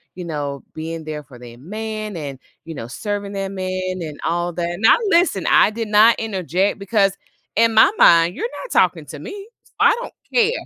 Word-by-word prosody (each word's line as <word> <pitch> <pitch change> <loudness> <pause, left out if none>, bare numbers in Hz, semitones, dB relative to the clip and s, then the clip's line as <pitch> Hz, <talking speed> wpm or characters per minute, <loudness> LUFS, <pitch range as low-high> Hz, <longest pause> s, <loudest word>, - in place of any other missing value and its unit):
you 180 -1 -7
know, 145 -4 -4
being 160 0 -6
there 155 -1 -5
for 130 -3 -15
their 120 -1 -12
man, 215 +3 -5
and, 140 -4 -6 0.3
you 165 - -7
know, 115 - -6
serving 205 - -4
their 195 -1 -3
man," 185 -1 -3
and 150 -3 -7
all 175 +1 -1
that. 175 +1 -3
Now 225 - +6
listen, 335 - +2
I - - +6
did 225 0 -4
not 215 +2 +5
interject, 195 -2 -1
because 195 -1 +1 0.4
in 230 0 +3
my 220 - +7
mind, 170 +1 +6
you're 465 - -2 0.2
not - - -10
talking - - +2
to - - -9
me, - - -8 0.3
s - - -26
I - - +6
don't - - -8 0.2
care. 460 -1 +4
185 Hz, 195 wpm, -20 LUFS, 165-215 Hz, 0.4 s, my